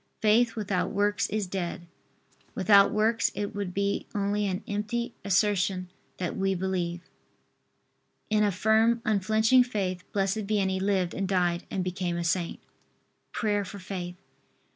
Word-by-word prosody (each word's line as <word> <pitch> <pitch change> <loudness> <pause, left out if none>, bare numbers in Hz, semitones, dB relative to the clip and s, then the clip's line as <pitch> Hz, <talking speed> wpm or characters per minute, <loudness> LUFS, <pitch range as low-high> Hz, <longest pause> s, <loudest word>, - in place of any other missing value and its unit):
Faith 225 +2 +3
without 200 -4 -1
works 205 +1 0
is 215 -1 -1
dead. 180 -1 -4 0.7
Without 200 +1 +5
works 215 0 +2
it 205 -1 -3
would 200 -3 -3
be 200 +2 -1
only 205 0 0
an 185 -1 -3
empty 215 +3 -2
assertion 190 -2 +1 0.3
that 180 -2 -3
we 195 0 0
believe. 175 -2 -2 1.3
In 215 0 +2
a 205 - +3
firm 220 +4 +2
unflinching 220 +4 +4
faith 190 -7 -3
Blessed 195 +1 -1
Vianney 190 -3 0
lived 190 -3 +1
and 195 0 -2
died 180 -2 +1
and 190 - -2
became 180 -1 -2
a 170 - -2
saint. 170 0 -1 0.7
PRAYER 205 -2 0
FOR 200 +2 -8
FAITH. 185 -2 -6
200 Hz, 140 wpm, -28 LUFS, 185-210 Hz, 1.3 s, Without